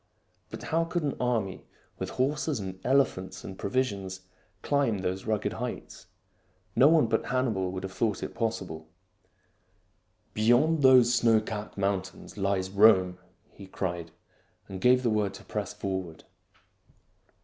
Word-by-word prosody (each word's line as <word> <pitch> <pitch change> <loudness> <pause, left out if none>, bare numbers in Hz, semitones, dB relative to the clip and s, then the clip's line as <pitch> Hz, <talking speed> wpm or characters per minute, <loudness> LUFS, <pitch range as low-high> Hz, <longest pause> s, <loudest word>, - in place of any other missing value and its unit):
But - - -8
how 165 +1 +1
could 165 0 -2
an 145 - -1
army 115 -6 -1 0.4
with - - -3
horses 145 +1 0
and 95 -1 -6
elephants 125 -8 +1
and 95 - -7
pro 100 - -4
visions 100 -6 -2 0.4
climb 140 -7 +1
those 95 0 -3
rugged 110 -1 -1
heights.? 125 +1 -6 0.7
No 135 - +6
one 160 -3 +5
but 110 0 0
Hannibal 115 -8 0
would 95 0 -5
have 95 - -5
thought 105 -2 -1
it - - -5
possible. 95 -9 -3 0.7
" - - -42
Beyond 120 +9 +3
these 130 -3 +6
snow 115 -2 +4
capped 110 -1 -6
mountains 95 -2 -3
lies 95 -2 -1
Rome! 95 -3 +5 0.2
" 95 - -37
he 100 - -10
cried, 85 -3 -4 0.6
and 95 -1 -7
gave 125 +1 +4
the 120 - +2
word 105 -2 0
to - - -12
press 105 -3 -4
forward. 95 -5 -5
105 Hz, 150 wpm, -28 LUFS, 95-125 Hz, 0.7 s, No